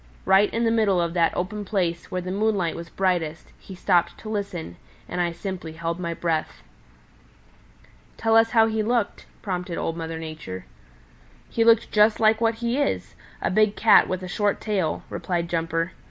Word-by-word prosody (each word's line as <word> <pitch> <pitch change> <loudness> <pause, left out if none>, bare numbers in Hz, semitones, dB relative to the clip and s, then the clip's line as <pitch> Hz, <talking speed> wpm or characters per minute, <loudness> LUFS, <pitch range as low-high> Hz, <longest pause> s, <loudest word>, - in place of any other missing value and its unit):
Right 195 +2 +4
in 230 - -1
the 225 - +3
middle 215 -5 +3
of 170 -1 -1
that 170 -2 +3
open 205 +4 -3
place, 180 -4 -2
where 185 - -2
the 185 - -4
moonlight 200 -4 0
was 170 0 -8
brightest, 170 -5 -1
he 190 - -11
stopped 180 -1 +1
to 215 - -7
listen, 185 - -4 0.3
and 180 - -2
I 175 -1 0
simply 170 -1 -6
held 165 +1 -3
my 170 -2 -3
breath." 155 - -2 1.5
"Tell 225 0 +2
us 225 0 +6
how 225 -1 +5
he 220 -1 0
looked," 230 0 -1 0.2
prompted 180 -3 -3
Old 165 - -2
Mother 165 -1 -5
Nature. 155 -13 -7 0.8
"He 230 - +1
looked 230 -1 +4
just 210 +1 +4
like 220 0 +4
what 225 0 +2
he 235 +3 -1
is 285 - -1 0.3
a - - +1
big 215 +1 +3
Cat 215 -2 +6
with 185 0 -3
a - - -5
short 205 +3 0
tail," 190 -8 -1
replied 175 -2 -2
Jumper. 165 0 -1
185 Hz, 180 wpm, -24 LUFS, 170-215 Hz, 1.5 s, us